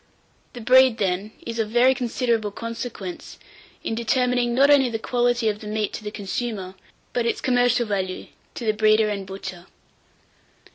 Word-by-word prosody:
The 245 - -8
breed, 255 0 +5
then, 195 0 -1
is 230 0 -4
of 220 -1 0
very 245 +3 +4
considerable 235 -3 -1
consequence 230 -4 -7 0.5
in - - -2
determining, 245 +1 +1
not 280 +3 +5
only 270 -3 +5
the 225 - -2
quality 240 0 0
of 210 -1 0
the 215 - -9
meat 215 -1 -2
to - - -6
the 210 - -4
consumer, 205 -2 -4 0.4
but 240 -1 0
its - - -1
commercial 245 -1 +2
value 190 -3 -3 0.3
to 240 - -5
the 215 - +2
breeder 215 0 +3
and 200 -2 -4
butcher. 190 -2 -8
225 Hz, 160 wpm, -23 LUFS, 210-245 Hz, 0.5 s, breed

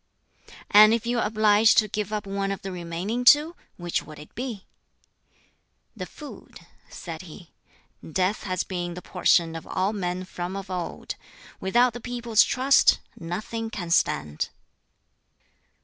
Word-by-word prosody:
"And 215 +2 +8
if 230 0 -4
you 240 0 0
are 220 - +1
obliged 215 0 +4
to 215 - +5
give 210 0 -3
up 210 -1 -3
one 195 0 -2
of 195 - -5
the 195 - -5
remaining 180 +7 -3
two, 300 +6 +6 0.2
which 175 -1 -2
would 155 0 -12
it 150 - -13
be?" 235 -6 -5 1.3
"The - - -6
food," 300 -2 -12 0.3
said 165 -3 -7
he. 175 -1 -13 0.6
"Death 185 +5 0
has 185 -2 -2
been 175 -2 -4
the 180 - -8
portion 170 -2 +2
of 165 - -8
all 190 +3 0
men 180 -2 -3
from 180 0 -5
of 195 -1 -6
old. 180 -2 -4 0.5
Without 240 +5 +3
the 240 - -8
people's 240 -2 +2
trust 270 +2 +4 0.2
nothing 215 +7 -5
can 175 -7 -5
stand." 75 - +1
195 Hz, 150 wpm, -25 LUFS, 175-225 Hz, 1.3 s, And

